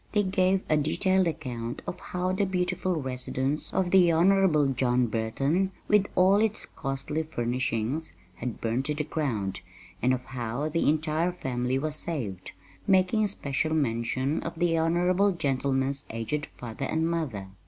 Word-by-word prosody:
They 210 -1 +3
gave 185 0 +2
a 155 - +3
detailed 185 +5 +2
account 125 -7 -4
of - - -5
how 180 +1 -2
the 190 +2 +1
beautiful 180 0 0
residence 130 0 -2
of 185 -2 0
the 180 -3 +6
Honorable 175 -2 +4
John 125 -1 +2
Burton, 135 - 0 0.2
with 210 -1 +4
all 190 +2 +5
its 215 0 +1
costly 135 +2 -3
furnishings, 125 0 -2 0.2
had 120 -1 -4
burned 115 +4 -1
to 150 +1 -1
the 150 - -1
ground, 120 -12 -2 0.4
and 125 - +3
of 130 -1 -1
how 125 +3 -3
the 165 0 +2
entire 155 +3 +1
family 130 -6 -2
was 155 +2 -1
saved, 120 - -4 0.3
making 190 +3 +3
special 155 -4 -1
mention 130 +1 0
of - - -6
the 170 -1 +2
honorable 180 +4 +2
gentleman's 135 -2 0
aged 115 +7 -3
father 120 +2 -5
and 160 +3 0
mother. 135 - -2
150 Hz, 150 wpm, -27 LUFS, 125-180 Hz, 0.4 s, the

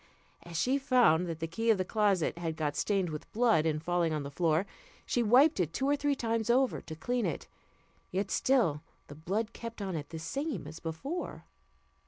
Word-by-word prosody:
As 170 -1 -5
she 265 +2 +2
found 240 - +4
that 165 -2 -5
the 165 - -1
key 225 +8 -2
of 220 - +5
the 185 - -1
closet 195 -5 +1
had 165 -2 -3
got 150 -2 -2
stained 195 -5 0
with 150 0 -7
blood 220 -9 +3
in 155 -1 +1
falling 170 0 0
on 150 -2 -2
the 140 - -6
floor, 165 +3 +1 0.4
she 245 - +1
wiped 255 +7 +5
it 170 -3 0
two 270 - -1
or 285 - +3
three 290 0 0
times 230 -2 -1
over 255 +2 +2
to 160 - -8
clean 240 +5 -1
it; 160 - -4 0.6
yet 195 +3 -2
still 225 - +2 0.3
the 145 - -9
blood 205 +9 -2
kept 230 -1 -7
on 190 -3 -3
it 150 -2 -5
the 165 - -6
same 220 - -3
as 155 +2 -9
before. 220 - -5
185 Hz, 205 wpm, -31 LUFS, 160-240 Hz, 0.6 s, of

